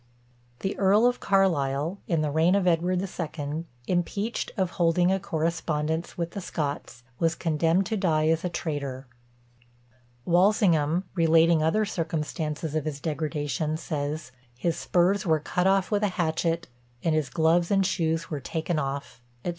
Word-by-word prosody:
The 195 - -2
Earl 200 +4 +4
of 245 0 +2
Carlisle, 165 -3 +1
in 165 -3 +1
the 150 -1 0
reign 165 +5 +3
of 200 -2 +1
Edward 180 +1 +2
the - - -2
Second, 160 -3 -4 0.2
impeached 200 +5 -1
of 185 -2 0
holding 175 +1 +2
a 195 - +1
correspondence 160 -2 -2
with 170 -1 -2
the 200 - -5
Scots, 140 -7 -4 0.2
was 165 0 +2
condemned 165 +3 +1
to 220 - -2
die 155 -5 +2
as 165 0 +1
a 180 - -1
traitor. 140 -5 -4 1.2
Walsingham, 175 -3 +3
relating 165 -1 +4
other 185 +8 +2
circumstances 160 -3 -3
of 155 -1 -1
his 150 -2 -3
degradation, 150 0 -2
says, 150 -4 -4 0.3
"His 165 +5 0
spurs 185 +3 +2
were 160 -3 +2
cut 180 +4 0
off 195 0 +2
with 205 -1 +2
a 210 - +3
hatchet; 165 0 0 0.4
and 165 - +2
his 155 -4 0
gloves 165 +5 +2
and 195 -1 +3
shoes 165 -3 0
were 150 - -2
taken 160 +4 -2
off," 140 -3 -4 0.2
&c. - - 0
165 Hz, 155 wpm, -26 LUFS, 155-180 Hz, 1.2 s, Earl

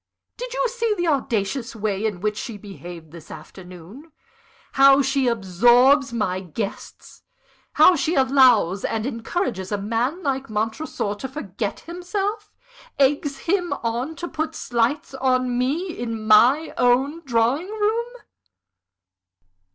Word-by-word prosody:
Did - - -7
you - - +1
see 465 -2 -1
the 350 - -1
audacious 245 -3 -1
way 215 -1 -1
in 190 -5 -5
which 210 0 -1
she 225 0 -6
behaved 175 -5 -11
this 170 -2 -13
afternoon? 185 - -12 0.6
how 275 0 +6
she 270 -1 +1
absorbs 240 +6 +4
my 195 -6 -1
guests? 195 +3 -7 0.5
how 365 - +6
she 330 +2 -1
allows 255 -8 +4
and 220 0 -2
encourages 230 - -3
a 205 - 0
man 230 - -2
like 270 -2 -2
Montresor 220 +1 -3
to 210 +6 -6
forget 215 -7 -5
himself? 400 +5 -4 0.5
eggs 280 0 +1
him 355 0 0
on 240 +7 -2
to 345 - -6
put 315 -1 -4
slights 245 +4 -1
on 255 -2 0
me 290 +9 -1
in 230 -2 -5
my 245 +9 +4
own 265 +6 +2
drawing 255 - 0
room!" 440 +3 -1
255 Hz, 130 wpm, -22 LUFS, 215-310 Hz, 0.6 s, how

